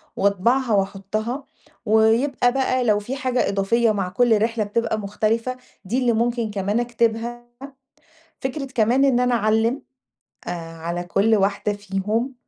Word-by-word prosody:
وأطبعها 225 Hz, +6 st, +1 dB
وأحطّها، 205 Hz, +6 st, -2 dB, 0.4 s
ويبقى 225 Hz, +4 st, +3 dB
بقى 260 Hz, -1 st, +1 dB
لو 210 Hz, -3 st, +3 dB
في 240 Hz, +6 st, -5 dB
حاجة 255 Hz, -2 st, 0 dB
إضافية 215 Hz, +4 st, +2 dB
مع 195 Hz, -3 st, -2 dB
كُلّ 225 Hz, +2 st, +3 dB
رحلة 225 Hz, 0 st, 0 dB
بتبقى 220 Hz, +1 st, -1 dB
مختلفة 220 Hz, +4 st, -1 dB, 0.3 s
دي 235 Hz, +7 st, 0 dB
اللي 245 Hz, -2 st, +2 dB
مُمكن 235 Hz, -1 st, 0 dB
كمان 205 Hz, +2 st, -1 dB
أكتبها، 235 Hz, 0 st, -1 dB, 0.9 s
فكْرة 270 Hz, +2 st, -3 dB
كمان 240 Hz, +5 st, +3 dB
إن 260 Hz, -3 st, +3 dB
أنا 250 Hz, -1 st, +2 dB
أعلِّم 225 Hz, +3 st, +1 dB, 0.7 s
آآ، -, -, -3 dB, 0.3 s
على 170 Hz, +2 st, -4 dB
كُلّ 200 Hz, +5 st, +2 dB
واحدة 200 Hz, +1 st, 0 dB
فيهم 205 Hz, +5 st, -2 dB
225 Hz, 135 wpm, -22 LUFS, 205-245 Hz, 0.9 s, ويبقى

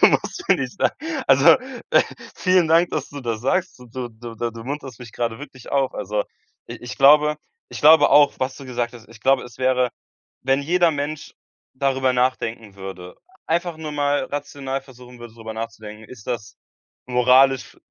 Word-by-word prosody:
du -, -, +9 dB
musst -, -, 0 dB
mir -, -, +6 dB
nicht -, -, -5 dB, 0.5 s
also, 135 Hz, +1 st, +5 dB, 0.4 s
äh, -, -, +6 dB, 0.3 s
vielen 185 Hz, -3 st, +3 dB
Dank, 165 Hz, +2 st, +4 dB
dass 150 Hz, -3 st, -3 dB
du 145 Hz, -, -8 dB
das 115 Hz, -4 st, -3 dB
sagst. 175 Hz, +8 st, -1 dB
Du 125 Hz, -1 st, -4 dB
du, 115 Hz, 0 st, -10 dB
da 120 Hz, +1 st, -2 dB
du 115 Hz, 0 st, -10 dB
munterst 135 Hz, -2 st, -6 dB
mich 120 Hz, -2 st, -10 dB
grade 115 Hz, -1 st, -3 dB
wirklich 130 Hz, -4 st, -11 dB
auf. 135 Hz, -2 st, +1 dB
Also, 105 Hz, +2 st, -2 dB, 0.5 s
i -, -, -6 dB
ich 120 Hz, +1 st, -8 dB
glaube 150 Hz, +2 st, +6 dB, 0.3 s
ich -, -, -8 dB
glaube 155 Hz, 0 st, +7 dB
auch, 145 Hz, -1 st, +6 dB
was 130 Hz, 0 st, -2 dB
du 140 Hz, -, -10 dB
gesagt 120 Hz, -2 st, -3 dB
hast 120 Hz, -2 st, -14 dB
ich 115 Hz, -1 st, -15 dB
glaube, 135 Hz, +1 st, +3 dB
es 120 Hz, -1 st, -13 dB
wäre 130 Hz, -1 st, +2 dB, 0.5 s
wenn 135 Hz, +2 st, +1 dB
jeder 175 Hz, +3 st, +3 dB
Mensch 145 Hz, 0 st, -4 dB, 0.4 s
darüber 130 Hz, -1 st, +1 dB
nachdenken 115 Hz, -4 st, -1 dB
würde, 95 Hz, -2 st, -9 dB, 0.3 s
einfach 170 Hz, 0 st, -1 dB
nur 155 Hz, -1 st, -6 dB
mal 145 Hz, -1 st, 0 dB
rational 140 Hz, -2 st, -4 dB
versuchen 125 Hz, -2 st, -15 dB
würde, 120 Hz, -1 st, -11 dB
drüber 110 Hz, -1 st, -8 dB
nachzudenken, 110 Hz, -1 st, -8 dB
ist 120 Hz, -5 st, -12 dB
das 115 Hz, -4 st, -4 dB, 0.5 s
moralisch 130 Hz, +2 st, +3 dB
f -, -, -29 dB
130 Hz, 180 wpm, -22 LUFS, 115-145 Hz, 0.5 s, du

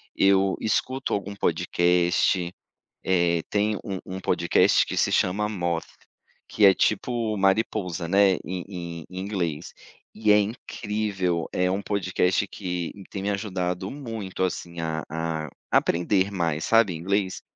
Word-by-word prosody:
eu 95 Hz, 0 st, +4 dB
escuto 130 Hz, +5 st, -1 dB
algum 100 Hz, 0 st, -3 dB
podcast, 90 Hz, 0 st, +1 dB, 0.5 s
eh, 85 Hz, -2 st, +2 dB
tem 105 Hz, 0 st, +1 dB
um 95 Hz, -2 st, -4 dB
um 95 Hz, 0 st, -6 dB
podcast 85 Hz, -2 st, +3 dB
que -, -, -5 dB
se -, -, +2 dB
chama 105 Hz, +3 st, +1 dB
Moth, 85 Hz, -5 st, -2 dB, 0.6 s
que 105 Hz, -, +3 dB
é 95 Hz, -, +8 dB
tipo 110 Hz, +2 st, 0 dB
mariposa, 95 Hz, -3 st, 0 dB
né, 100 Hz, +1 st, +4 dB
em 90 Hz, -1 st, -4 dB
em 85 Hz, -4 st, -6 dB
em 90 Hz, -, -6 dB
inglês, 90 Hz, -5 st, -3 dB, 0.4 s
e 110 Hz, -1 st, +2 dB
é 105 Hz, -, +7 dB
incrível, 100 Hz, -5 st, -2 dB
é 90 Hz, 0 st, +1 dB
um 95 Hz, +2 st, -1 dB
podcast 95 Hz, 0 st, 0 dB
que 90 Hz, -3 st, -4 dB, 0.2 s
tem 95 Hz, -, -4 dB
me 100 Hz, -, 0 dB
ajudado 95 Hz, -2 st, -2 dB
muito 115 Hz, -10 st, -6 dB
assim 85 Hz, -2 st, -3 dB
a 80 Hz, -1 st, -2 dB
a 80 Hz, -1 st, -3 dB, 0.2 s
aprender 95 Hz, +3 st, +2 dB
mais, 80 Hz, -4 st, -1 dB
sabe, 115 Hz, -5 st, +4 dB
inglês, 95 Hz, +3 st, -1 dB
95 Hz, 135 wpm, -25 LUFS, 85-100 Hz, 0.6 s, é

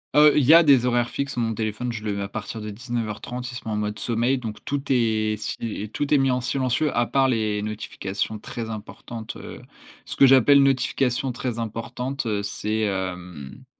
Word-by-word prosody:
Heu, 150 Hz, 0 st, +7 dB
il 150 Hz, -, +4 dB
y 155 Hz, -, +7 dB
a 170 Hz, -, +9 dB
des 135 Hz, -5 st, +5 dB
horaires 120 Hz, -1 st, +1 dB
fixes. 140 Hz, +1 st, -3 dB
Mon 115 Hz, -2 st, 0 dB
téléphone, 110 Hz, +3 st, -3 dB
je 110 Hz, -2 st, -6 dB
le 105 Hz, -, -1 dB
mets 100 Hz, -, -3 dB
à 100 Hz, -, -5 dB
partir 110 Hz, +2 st, -6 dB
de 105 Hz, -, -5 dB
19:30, 120 Hz, +2 st, -4 dB
il -, -, -9 dB
se -, -, -8 dB
met 110 Hz, -, -2 dB
en -, -, -1 dB
mode 105 Hz, 0 st, -2 dB
sommeil, 120 Hz, +3 st, +1 dB
donc 110 Hz, -4 st, -7 dB
tout 145 Hz, 0 st, -2 dB
est 110 Hz, -4 st, +2 dB
sil 115 Hz, -, -4 dB, 0.2 s
et 105 Hz, -, -6 dB
tout 145 Hz, +5 st, -1 dB
est -, -, +6 dB
mis 135 Hz, -1 st, +3 dB
en 125 Hz, -, +1 dB
silencieux, 130 Hz, +3 st, 0 dB
à 120 Hz, -, +3 dB
part 135 Hz, +2 st, +2 dB
les 110 Hz, -4 st, 0 dB
notifications 105 Hz, 0 st, -4 dB
très 115 Hz, +1 st, -6 dB
importantes, 110 Hz, +1 st, -7 dB
heu, -, -, -9 dB, 0.4 s
ce -, -, -6 dB
que -, -, +6 dB
j'appelle 135 Hz, +2 st, +6 dB
notifications 135 Hz, -1 st, +1 dB
«très 120 Hz, -1 st, -3 dB
importantes», 120 Hz, +4 st, -4 dB
heu, 105 Hz, -3 st, 0 dB
c'est, 105 Hz, +1 st, -2 dB
hem 90 Hz, -, -4 dB
115 Hz, 210 wpm, -24 LUFS, 105-130 Hz, 0.4 s, a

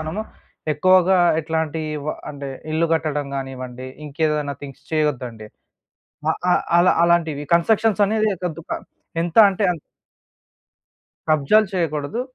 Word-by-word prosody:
మనము 160 Hz, +7 st, -3 dB, 0.5 s
ఎక్కువగా 185 Hz, +4 st, +4 dB, 0.2 s
ఎట్లాంటి 160 Hz, 0 st, -2 dB, 0.3 s
వ -, -, -2 dB, 0.2 s
అంటే 140 Hz, -1 st, -7 dB, 0.2 s
ఇల్లు 165 Hz, +1 st, +2 dB
కట్టడం 150 Hz, -3 st, 0 dB
గానివ్వండి, 130 Hz, -1 st, -6 dB, 0.2 s
ఇంకేదైనా 150 Hz, -1 st, -1 dB
థింగ్స్ 135 Hz, -2 st, -10 dB
చేయొద్దండి. 125 Hz, -8 st, -1 dB, 0.8 s
అ -, -, +5 dB, 0.2 s
అ -, -, +6 dB, 0.2 s
అలా 175 Hz, +1 st, +5 dB
అలాంటివి 165 Hz, -4 st, +2 dB
కన్స్‌ట్రక్షన్స్ 215 Hz, +4 st, +3 dB
అనేది 215 Hz, 0 st, +1 dB
కొద్దు 170 Hz, -2 st, -3 dB
ప -, -, -6 dB, 0.5 s
ఎంత 170 Hz, +4 st, -3 dB
అంటే 195 Hz, +2 st, -2 dB
అన్ 170 Hz, -, -5 dB, 1.5 s
కబ్జాలు 155 Hz, +9 st, +4 dB
చేయకూడదు. 160 Hz, +5 st, -1 dB
160 Hz, 115 wpm, -21 LUFS, 145-180 Hz, 1.5 s, అ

